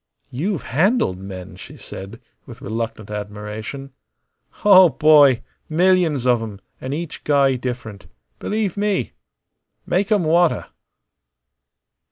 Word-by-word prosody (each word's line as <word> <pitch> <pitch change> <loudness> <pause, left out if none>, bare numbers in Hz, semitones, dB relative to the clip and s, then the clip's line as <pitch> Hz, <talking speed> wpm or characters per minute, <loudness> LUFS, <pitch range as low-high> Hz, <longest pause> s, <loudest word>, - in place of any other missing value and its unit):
"You've 165 +7 -2
handled 160 - +1
men," 95 -2 -9
she - - -12
said, 100 +5 -10 0.3
with - - -11
reluctant 110 -1 -5
admiration. 105 +6 -7 0.7
"Oh, 190 -3 +8
boy! 145 -6 +5 0.3
millions 170 -5 +2
of 120 -2 +3
'em, 105 -3 -7 0.2
an' 130 - -5
each 160 +2 -5
guy 140 -2 +3
different. 120 -5 -6 0.3
Believe 210 -3 -2
me! 205 -1 -1 0.7
Make 195 +4 0
'em 205 -4 +3
wanta." 170 +1 +2
135 Hz, 110 wpm, -20 LUFS, 110-175 Hz, 0.7 s, Oh